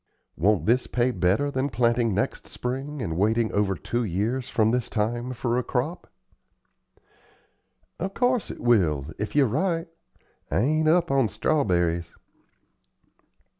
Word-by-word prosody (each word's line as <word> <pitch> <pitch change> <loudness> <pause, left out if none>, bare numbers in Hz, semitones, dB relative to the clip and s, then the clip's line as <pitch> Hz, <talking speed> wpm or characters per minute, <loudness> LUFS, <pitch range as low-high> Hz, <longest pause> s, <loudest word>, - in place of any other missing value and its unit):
Won't 90 -1 +2
this 120 +3 +2
pay 125 +1 +1
better 110 +8 +1
than 135 +1 -1
planting 115 -3 +1
next 100 - -2
spring 135 +2 -4
and 80 -5 -3
waiting 110 +2 +2
over 100 -2 +1
two 120 +5 -2
years 115 +7 -2
from 110 -1 +2
this 125 0 -1
time 120 +3 -1
for 120 0 -1
a - - -2
crop?" 140 +10 -3 1.9
"Of 195 +1 -4
course 250 -3 +1
it - - -8
will, 85 - +2
if 105 +5 -4
you're 145 -2 +5
right. 165 - 0 0.6
I - - 0
ain't 155 +7 +2
up 165 -1 +3
on 135 -4 +3
strawberries." 90 - 0
120 Hz, 135 wpm, -25 LUFS, 105-135 Hz, 1.9 s, you're